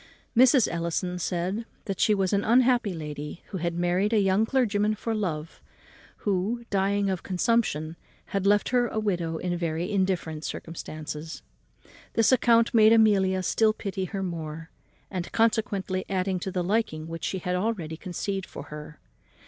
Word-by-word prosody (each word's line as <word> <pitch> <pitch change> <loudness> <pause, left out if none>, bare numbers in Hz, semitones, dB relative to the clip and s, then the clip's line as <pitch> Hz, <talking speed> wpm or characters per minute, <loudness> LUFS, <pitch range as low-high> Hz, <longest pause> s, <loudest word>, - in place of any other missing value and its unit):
Mrs. 255 0 +6
Ellison 170 +2 -2
said 180 +5 -2 0.2
that 195 -2 -4
she 215 - +4
was 195 0 0
an 200 0 +2
unhappy 245 -2 +3
lady, 150 0 -6
who 190 - -4
had 170 0 -2
married 175 +5 +1
a 220 - +5
young 195 +2 +3
clergyman 215 -5 +1
for 225 +2 -3
love, 165 -7 -3 0.6
who, 205 +4 0
dying 200 +1 +1
of 185 - -2
a - - -20
consumption, 180 -5 0 0.4
had 195 0 +1
left 205 0 +3
her 245 -1 +2
a 220 - -5
widow 175 -6 -1
in 175 +1 -2
very 170 +2 -2
indifferent 185 -6 -1
circumstances. 155 -1 -6 0.7
This 225 +1 +4
account 235 -1 +4
made 220 -1 +7
Amelia 195 -4 +4
still 215 +4 +3
pity 195 -3 -4
her 195 0 -4
more, 165 -2 -5 0.4
and 180 -3 -4
consequently 210 -4 +1
added 185 -1 -1
to 190 - -3
the 180 -1 -1
liking 180 -5 -1
which 165 0 -7
she 190 - -1
had 180 0 -2
already 180 -5 -2
conceived 190 +2 -4
for 140 - -8
her. 150 0 -9
190 Hz, 160 wpm, -27 LUFS, 170-215 Hz, 0.7 s, made